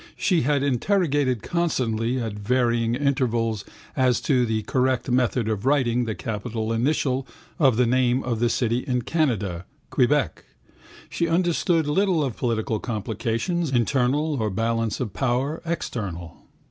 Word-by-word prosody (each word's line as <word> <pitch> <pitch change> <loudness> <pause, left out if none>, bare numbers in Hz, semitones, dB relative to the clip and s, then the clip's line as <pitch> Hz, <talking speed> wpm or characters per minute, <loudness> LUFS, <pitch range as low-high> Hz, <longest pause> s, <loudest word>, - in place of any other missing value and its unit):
She 180 -4 +2
had 140 +1 +1
interrogated 140 - +1
constantly 125 -9 0
at 115 -3 -3
varying 115 +2 +1
intervals 120 -6 0 0.3
as 130 -3 +3
to 125 -4 +2
the 110 -1 -1
correct 130 +2 0
method 125 -2 +1
of 110 -3 -2
writing 125 -3 +2
the 110 -2 -3
capital 110 +4 -3
initial 130 +2 0 0.3
of 135 -7 +4
the 125 - +4
name 125 +1 +2
of 120 -3 -2
a 120 - +3
city 120 0 +1
in 125 -2 -2
Canada, 105 - -1 0.3
Quebec. 140 +2 +1 0.6
She 170 - -1
understood 170 -1 +1
little 180 +1 +2
of 130 -5 -2
political 115 -2 -1
complications, 115 - -2
internal, 135 +3 +1
or 110 - 0
balance 115 +2 -1
of 115 -7 -3
power, 130 +6 -1
external. 100 - -5
125 Hz, 135 wpm, -24 LUFS, 115-140 Hz, 0.6 s, of